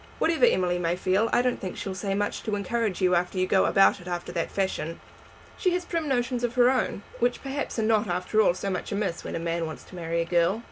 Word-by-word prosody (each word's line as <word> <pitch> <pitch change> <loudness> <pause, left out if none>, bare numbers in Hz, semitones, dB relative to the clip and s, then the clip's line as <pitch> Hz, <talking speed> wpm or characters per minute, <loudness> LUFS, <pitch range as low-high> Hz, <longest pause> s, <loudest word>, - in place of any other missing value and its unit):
Whatever 330 +9 +3
Emily 180 - +2
may 170 0 0
feel 190 +5 +1
I 245 - +3
don't 250 -1 0
think 185 - -5
she'll 195 - -4
say 195 +1 -2
much 205 +1 -1
to 215 -2 -2
encourage 205 -1 -1
you 180 0 +4
unless 180 +2 +1
you 185 0 +2
go 190 0 +3
about 195 0 +4
it 175 - -12
after 175 -1 -4
that 170 -2 -2
fashion. 165 -4 -2 0.6
She 365 -2 +2
has 360 0 -1
prim 335 -3 -2
notions 245 -2 0
of 240 0 -1
her 250 0 +5
own, 250 -5 -1 0.2
which 245 +1 0
perhaps 275 0 -4
are 225 - +1
not 215 -1 +2
after 180 +5 +1
all 175 - +3
so 195 +1 -3
much 180 - -4
amiss 200 -4 -2
when - - -5
a - - -2
man 165 0 -2
wants 155 - -8
to - - -14
marry 170 -1 -2
a 165 - 0
girl." 175 +4 +2
195 Hz, 250 wpm, -26 LUFS, 175-240 Hz, 0.6 s, her